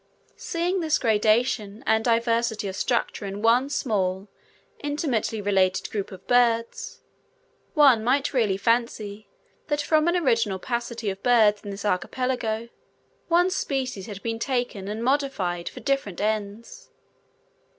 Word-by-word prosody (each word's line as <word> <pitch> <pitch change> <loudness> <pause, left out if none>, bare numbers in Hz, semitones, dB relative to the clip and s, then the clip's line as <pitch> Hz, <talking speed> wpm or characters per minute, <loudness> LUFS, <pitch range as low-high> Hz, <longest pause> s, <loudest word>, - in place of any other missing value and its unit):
Seeing 350 +3 -1
this 315 -3 +1
gradation 215 -1 +1
and 220 0 +2
diversity 230 -2 +1
of 190 - -5
structure 235 +1 -1
in 200 +1 -5
one 245 +4 +4
small, 195 -7 -1 0.5
intimately 285 -7 -1
related 190 -2 +1
group 205 -3 -3
of 190 -1 -11
birds, 235 -2 +1 0.7
one 270 -7 +6
might 270 +5 +1
really 215 -7 +2
fancy 215 -2 -1 0.4
that 295 -1 0
from 310 +1 +2
an 345 - +2
original 230 - +1
paucity 235 0 -3
of 190 +1 -9
birds 220 -4 +4
in 205 - -8
this 200 +1 -6
archipelago, 225 +3 -1 0.6
one 350 +2 +3
species 260 - -2
had 200 -2 -8
been 225 -1 -3
taken 245 -6 -2
and 215 +3 -4
modified 240 -11 0
for - - -11
different 275 -10 -1
ends. 210 +1 -3
230 Hz, 130 wpm, -25 LUFS, 205-260 Hz, 0.7 s, one